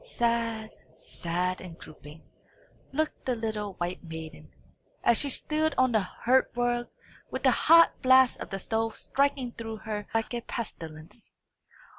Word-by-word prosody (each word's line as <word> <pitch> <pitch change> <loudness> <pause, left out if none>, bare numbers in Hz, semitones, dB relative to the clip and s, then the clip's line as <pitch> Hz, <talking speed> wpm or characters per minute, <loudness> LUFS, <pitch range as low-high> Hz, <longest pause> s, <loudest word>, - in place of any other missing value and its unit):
Sad, 230 - -1 0.2
sad 180 +2 -2
and 170 -3 -9
drooping, 155 0 -13 0.7
looked 310 +3 -2
the 255 - 0
little 215 -3 -3
white 175 +1 -4
maiden, 160 -1 -9 0.5
as 235 - +4
she 285 - 0
stood 310 +2 0
on 255 -1 +4
the 220 - +4
hearth 245 +7 +2
rug, 240 0 0 0.4
with - - -5
the - - +6
hot 335 0 +6
blast 260 -1 +5
of - - -6
the 195 - -3
stove 225 +3 -1
striking 275 -2 0
through 225 -1 -6
her 210 -1 -5
like 225 +1 -1
a 240 - -2
pestilence. 165 -4 -7
225 Hz, 145 wpm, -28 LUFS, 185-255 Hz, 0.7 s, the